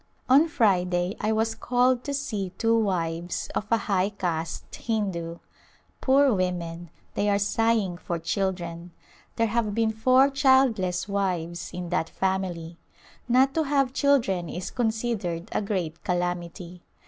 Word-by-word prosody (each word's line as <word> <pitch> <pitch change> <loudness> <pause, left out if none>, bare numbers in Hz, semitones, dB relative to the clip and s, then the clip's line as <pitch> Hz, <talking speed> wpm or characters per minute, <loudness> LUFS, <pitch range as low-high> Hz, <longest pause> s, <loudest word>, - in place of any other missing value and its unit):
On 275 +5 +6
Friday 180 - +1
I 215 - 0
was 220 +1 +1
called 250 +1 +1
to 285 - -2
see 215 -9 -3
two 230 0 +2
wives 170 -5 -1
of 210 - -2
a 230 - +4
high 195 -3 0
caste 170 -5 -4
Hindu. 190 -7 -2 0.6
Poor 275 -1 +4
women, 175 -3 -2 0.2
they 205 - 0
are 200 - +3
sighing 205 -2 +1
for 170 - -3
children! 175 -1 -3 0.4
There 230 - +2
have 220 -2 0
been 225 -1 +2
four 255 +5 +4
childless 260 -10 +3
wives 175 -4 -2
in 180 -1 -5
that 170 -2 0
family. 180 -3 -2 0.5
Not 260 +3 +4
to 320 - +1
have 275 -3 +1
children 230 - +2
is 180 +1 -5
considered 220 -6 -2
a - - 0
great 180 -6 -3
calamity. 175 0 -3
195 Hz, 135 wpm, -26 LUFS, 175-230 Hz, 0.6 s, On